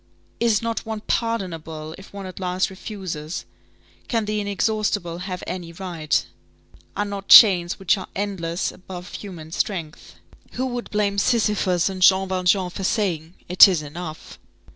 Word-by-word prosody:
Is 230 -2 +2
not 230 0 -2
one 220 -1 -5
pardonable, 165 -10 -3
if 195 - -14
one 200 -1 -7
at 185 0 -8
last 185 +1 -1
refuses! 185 -5 -6 0.6
Can 225 -3 0
the 210 0 -1
inexhaustible 205 -3 -1
have 180 -1 -5
any 175 -2 -5
right? 170 -4 -1 0.7
Are 205 - 0
not 200 -1 -6
chains 180 -5 +8
which 195 +1 +1
are 185 - -7
endless 185 -3 -2
above 180 -1 -10
human 170 -6 -8
strength? 165 -4 -4 0.4
Who 260 - -2
would 245 -2 -4
blame 205 -1 0
Sisyphus 200 -6 +2
and 190 -1 -4
Jean 190 +1 +5
Valjean 185 0 +1
for 195 - -6
saying: 180 -5 -1
"It 180 +3 +9
is 175 -6 0
enough!" 155 +1 -8
190 Hz, 145 wpm, -23 LUFS, 175-205 Hz, 0.7 s, It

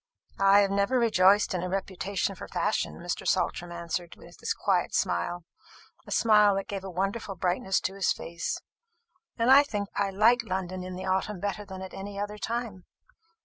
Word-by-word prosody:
"I 195 +1 +6
have 200 -1 +1
never 200 +6 +2
rejoiced 205 -4 +4
in 180 - -1
a 180 - -3
reputation 195 +1 -2
for - - -9
fashion," - - -1
Mr. - - -4
Saltram 175 0 0
answered, 170 0 -4
with - - -16
his - - -3
quiet - - 0
smile 165 - -1 0.6
a - - -10
smile 210 -3 +5
that 195 - -3
gave 195 -2 -5
a 195 - -6
wonderful 195 +3 -2
brightness 185 +2 0
to 190 - -2
his 195 -1 +1
face; 170 0 -3 0.8
"and 235 +2 +3
I 275 +1 +10
think 205 -8 -3
I 200 -1 0
like 220 +5 +4
London 185 -4 -4
in 185 0 -6
the 185 +1 -6
autumn 190 +1 -1
better 205 +1 -3
than 190 -1 -8
at 190 - -9
any 200 +1 -6
other 205 +1 -4
time. 225 -3 -4
195 Hz, 185 wpm, -28 LUFS, 185-205 Hz, 0.8 s, I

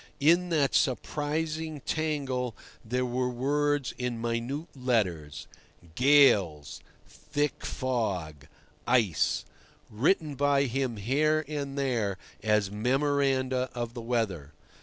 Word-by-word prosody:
In 170 +5 +4
that 145 -5 +2
surprising 155 +3 -1
tangle 135 -7 -2 0.3
there 125 +3 -1
were 125 +1 -1
words 145 +1 0
in 125 -2 -2
minute 120 +8 -3
letters—"gales," 95 - +1 0.3
"thick 145 0 -3
fog," 95 - -2 0.4
"ice"—written 120 - 0
by 140 0 +2
him 130 -2 -1
here 150 +8 +1
and 140 -2 -4
there 115 -8 0 0.2
as 105 -2 +1
memoranda 130 +2 +1
of 120 -1 -3
the 120 - -6
weather. 105 - -2
130 Hz, 95 wpm, -28 LUFS, 115-145 Hz, 0.4 s, In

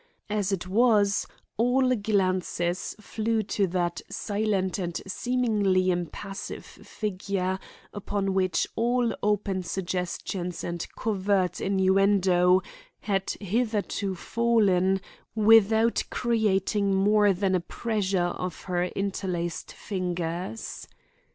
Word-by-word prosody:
As 205 -2 0
it 185 -2 -2
was, 210 -1 +3 0.3
all 255 +2 +3
glances 185 -4 0
flew 220 +1 -1
to 200 0 0
that 175 -1 -1
silent 205 -3 -1
and 175 -2 -3
seemingly 205 -4 +1
impassive 180 +3 -5
figure 190 -2 -3 0.3
upon 200 -1 -2
which 185 -2 +1
all 240 +1 +1
open 205 -2 0
suggestions 180 0 -3
and 170 -1 -4
covert 195 -4 0
innuendo 190 -1 +3 0.4
had 195 -2 -1
hitherto 205 -2 -1
fallen 195 -4 +2 0.4
without 225 +1 +5
creating 205 -3 +1
more 205 +1 +4
than 190 0 0
a 185 - +3
pressure 190 -2 -1
of 180 -2 -5
her 180 -1 0
interlaced 180 -3 -3
fingers. 180 +1 -4
195 Hz, 95 wpm, -27 LUFS, 185-215 Hz, 0.4 s, without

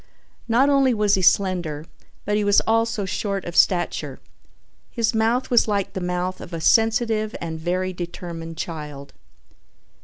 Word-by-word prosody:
Not 240 +4 +3
only 275 -3 +3
was 210 -1 +2
he 190 - +3
slender 180 -5 +1 0.4
but 210 - 0
he 210 - +1
was 205 0 +4
also 225 -2 0
short 195 0 -3
of 175 - -6
stature. 175 -2 +1 0.7
His 230 -2 0
mouth 230 +4 0
was 240 -2 +4
like 200 -2 -1
the 190 - -4
mouth 180 +1 -3
of 175 - -10
a 165 - -3
sensitive 225 +2 +2
and 160 -1 -5
very 185 +3 -2
determined 170 -2 -7
child. 150 -4 -7
190 Hz, 150 wpm, -22 LUFS, 175-225 Hz, 0.7 s, was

